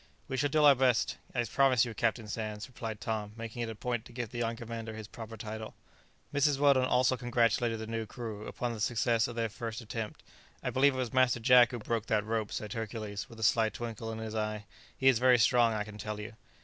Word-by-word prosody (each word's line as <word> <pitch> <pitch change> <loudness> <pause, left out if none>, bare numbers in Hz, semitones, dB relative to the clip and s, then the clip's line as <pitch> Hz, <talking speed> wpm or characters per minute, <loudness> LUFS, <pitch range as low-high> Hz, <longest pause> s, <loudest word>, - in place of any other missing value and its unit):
"We 130 - -3
shall 145 +2 +1
do 155 +1 +3
our 145 -1 +9
best, 125 -3 +2 0.2
I 120 - +2
promise 130 +1 +3
you, 115 - -5
Captain 115 0 0
Sands," 105 0 -4
replied 115 -4 -6
Tom, 105 -1 -3
making 115 +1 -6
it 115 - -2
a 110 - -6
point 120 0 -2
to - - -13
give 120 -2 -5
the 120 - -5
young 115 0 -1
commander 115 -1 -6
his 110 -2 -7
proper 115 0 -9
title. 110 +1 -6 0.6
Mrs. 145 0 +3
Weldon 140 -2 +4
also 130 0 +3
congratulated 120 -1 +1
the 110 - -5
new 115 0 -3
crew 110 -3 -6
upon 120 -1 -3
the 110 - -7
success 115 +1 +2
of 120 - -7
their 115 -1 0
first 110 +1 -5
attempt. 110 -1 -6 0.4
"I - - -1
believe 135 +1 +4
it - - -4
was 125 -3 -2
Master 130 -2 +3
Jack 125 0 +7
who 120 - -4
broke 115 0 -2
that 105 -1 +1
rope," 110 -1 -2
said 105 -1 -4
Hercules, 110 -3 -5
with 115 - -12
a - - -4
sly 110 0 +4
twinkle 115 0 -5
in 110 - -5
his 110 -1 -5
eye; 110 -1 -2 0.3
"he 130 - +2
is 130 -4 +6
very 125 0 +6
strong, 120 0 +4
I 105 - -1
can 105 0 -11
tell 105 +1 -4
you." 105 +2 -7
115 Hz, 235 wpm, -31 LUFS, 110-125 Hz, 0.6 s, our